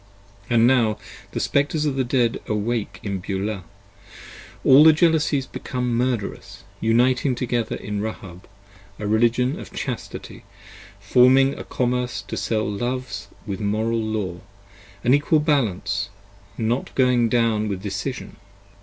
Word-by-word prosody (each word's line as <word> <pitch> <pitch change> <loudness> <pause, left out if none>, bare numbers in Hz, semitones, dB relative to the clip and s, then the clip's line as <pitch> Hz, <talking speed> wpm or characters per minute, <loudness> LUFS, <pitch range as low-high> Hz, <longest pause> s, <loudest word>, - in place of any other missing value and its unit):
And 115 -1 +4
now 120 -4 +3 0.3
the - - -3
Spectres 145 +2 +1
of 145 -3 0
the 135 - +1
Dead 120 -2 +1
awake 105 -2 -2
in 100 -3 -3
Beulah: 100 +1 -3 1.0
all 135 +3 +8
The 160 0 +8
Jealousies 155 -4 +2
become 125 -2 -3
Murderous, 120 -3 -3 0.2
uniting 125 +3 +2
together 120 -2 -1
in 105 -1 -4
Rahab, 100 -5 -7 0.5
A 105 - -5
Religion 120 +5 +2
of - - -10
Chastity, - - -6 0.6
forming 130 +6 +5
a - - -7
Commerce 125 -3 -2
to - - -3
sell 110 -1 -1
Loves 120 -1 -3 0.2
35 - - -21
With 100 -2 -4
Moral 110 +2 0
Law, 105 -5 -3 0.6
an 125 - +4
Equal 145 +2 +3
Balance, 105 - 0 0.5
not 115 +3 -2
going 125 -3 +3
down 115 -2 +1
with 95 -2 -4
decision. 100 +6 -5
115 Hz, 130 wpm, -23 LUFS, 105-130 Hz, 1.0 s, all